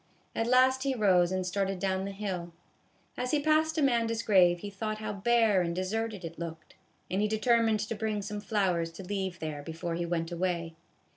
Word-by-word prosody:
At 225 - 0
last 260 +1 +4
he 270 -1 0
rose 185 -5 +3
and 185 -1 -1
started 195 +1 -1
down 190 +1 -1
the 200 - -4
hill. 185 -4 -4 0.6
As 250 - -2
he 300 - +2
passed 310 +1 +2
Amanda's 230 -5 +1
grave 175 -4 +4
he 205 - -6
thought 215 +2 -3
how 215 -1 -4
bare 215 -1 +3
and 170 -1 -2
deserted 205 +1 -2
it 165 0 -8
looked; 165 -2 -7 0.4
and 190 +2 +1
he 210 - +2
determined 220 0 +2
to 215 +2 -3
bring 215 -1 -2
some 205 +1 -5
flowers 185 -6 0
to 180 - -9
leave 190 -1 -3
there 155 -3 -5
before 165 +2 -5
he 170 +1 -2
went 165 0 -2
away. 170 -1 -2
195 Hz, 195 wpm, -30 LUFS, 175-225 Hz, 0.6 s, last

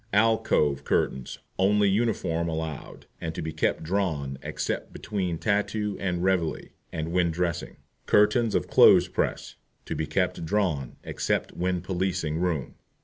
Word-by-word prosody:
ALCOVE 100 -10 +3
CURTAINS 65 -2 -1 0.2
Only 100 +2 +4
uniform 95 -6 0
allowed, 80 -2 -5 0.2
and 80 -1 -4
to - - -3
be 80 0 -4
kept 80 - 0
drawn, 80 -7 -1
except - - -3
between 90 -5 -3
"Tattoo" 105 +1 0
and 90 -2 -1
"Reveille" 95 -4 0 0.2
and 80 0 -3
when 90 -1 +2
dressing. 85 0 -2 0.3
CURTAINS 105 +2 +4
OF - - +1
CLOTHES - - +6
PRESS - - -2 0.3
To - - -4
be 80 - -2
kept 90 +3 0
drawn, 80 -8 -1
except - - -1
when 90 0 -1
policing 90 -4 -1
room. 85 -7 -2
90 Hz, 140 wpm, -27 LUFS, 80-100 Hz, 0.3 s, CLOTHES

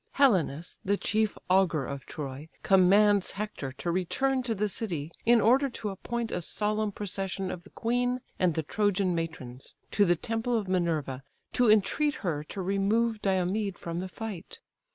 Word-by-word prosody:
Helenus, 180 - +2
the 200 +1 +1
chief 215 0 0
augur 180 -6 +3
of 140 0 -6
Troy, 145 +1 -6
commands 195 +1 +5
Hector 205 -10 -4
to 170 +6 -3
return 260 +10 0
to 240 -3 -2
the 210 +1 0
city, 170 -8 -4 0.2
in 240 0 +7
order 260 +6 +4
to 220 -3 -4
appoint 235 +4 -4
a - - -2
solemn 210 +4 -1
procession 195 -1 -3
of 175 - -7
the - - -16
queen 245 +2 0 0.2
and 175 -4 +2
the 160 - 0
Trojan 200 +1 +1
matrons 160 -7 -5 0.2
to 205 - +4
the 175 -3 +4
temple 225 +6 -1
of 210 -3 -3
Minerva, 160 -8 0 0.3
to 245 -2 +4
entreat 250 +8 +3
her 150 -4 -1
to 190 +4 -5
remove 210 +4 +1
Diomed 190 +1 0
from 170 0 -4
the 185 +1 -4
fight. 205 -3 -7
195 Hz, 165 wpm, -29 LUFS, 170-220 Hz, 0.3 s, in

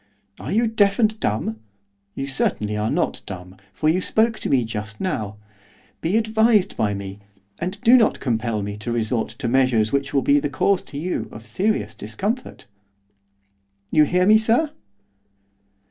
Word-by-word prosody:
'Are - - -6
you 230 +4 +3
deaf 205 -3 +2
and 215 -2 +2
dumb? 110 +1 -1 0.6
You 135 - -3
certainly 105 -6 -1
are 105 +1 -1
not - - -1
dumb, 90 0 -8
for 155 - -2
you 170 +4 +3
spoke 220 +3 +1
to - - -3
me 125 -4 +3
just 110 -1 -6
now. 110 - -3 0.6
Be 180 +7 +1
advised 220 -2 +3
by 105 -2 0
me, 100 0 -7 0.4
and 185 +4 -4
do 240 +3 +7
not 230 -4 +4
compel 115 -4 -1
me 100 +1 -5
to 110 +3 -5
resort 115 0 0
to 130 -3 -3
measures 120 -3 +2
which 140 0 0
will 135 -2 +1
be 145 +1 +4
the 145 0 -2
cause 180 +8 +1
to 140 - -9
you 175 +5 -3
of 110 +1 -10
serious 210 - -1
discomfort. 200 - -4 1.3
You 155 -1 +5
hear 180 +4 +2
me, 215 +2 +6
sir? 235 +8 +2
140 Hz, 165 wpm, -22 LUFS, -, 1.3 s, do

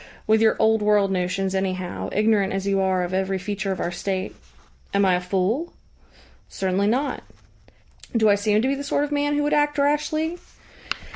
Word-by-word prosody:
"With 220 0 +3
your 220 -1 +4
old 220 0 +3
world 210 -2 +3
notions, 185 +1 -1
anyhow, 185 -2 -3
ignorant 210 -2 +2
as 195 0 -2
you 195 -1 +1
are 190 -1 +1
of 175 +1 -4
every 190 0 0
feature 195 +1 -3
of 190 - -3
our 175 - -2
State." 185 +2 -3 0.6
"Am 200 0 +4
I 185 - +4
a 180 - +1
fool?" 195 - -1 0.8
"Certainly 190 +1 0
not." 260 +7 0 1.0
"Do 220 -1 +4
I 205 - +6
seem 210 +2 +1
to - - +2
be 270 - +1
the 280 +1 -4
sort 285 0 0
of 295 - -3
man 290 0 0
who 295 - +1
would 295 - 0
act 295 0 +2
rashly?" 300 +4 0
205 Hz, 190 wpm, -23 LUFS, 190-275 Hz, 1.0 s, I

